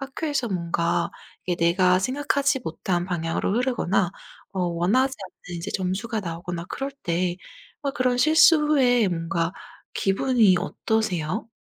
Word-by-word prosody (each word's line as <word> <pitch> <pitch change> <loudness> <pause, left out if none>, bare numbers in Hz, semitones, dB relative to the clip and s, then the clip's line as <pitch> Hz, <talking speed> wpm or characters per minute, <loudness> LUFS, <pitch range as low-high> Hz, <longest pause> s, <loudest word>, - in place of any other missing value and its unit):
학교에서 275 -2 -2
뭔가 170 -2 -1 0.4
이게 175 -1 0
내가 180 +2 +4
생각하지 275 +4 0
못한 175 +2 -2
방향으로 170 +1 -1
흐르거나 210 -8 +1 0.4
어 190 - -2
원하지 185 +11 +1 0.4
않는 175 -1 -5
이제 190 +5 -5
점수가 205 +5 -2
나오거나 170 -1 -5
그럴 275 +1 -4
때 175 +1 -1 0.5
어 280 - 0
그런 255 -2 +1
실수 315 +4 +6
후에 250 -8 +3
뭔가 165 0 -1 0.4
기분이 205 -1 +3
어떠세요? 215 -2 -2
195 Hz, 300 characters per minute, -24 LUFS, 175-255 Hz, 0.5 s, 실수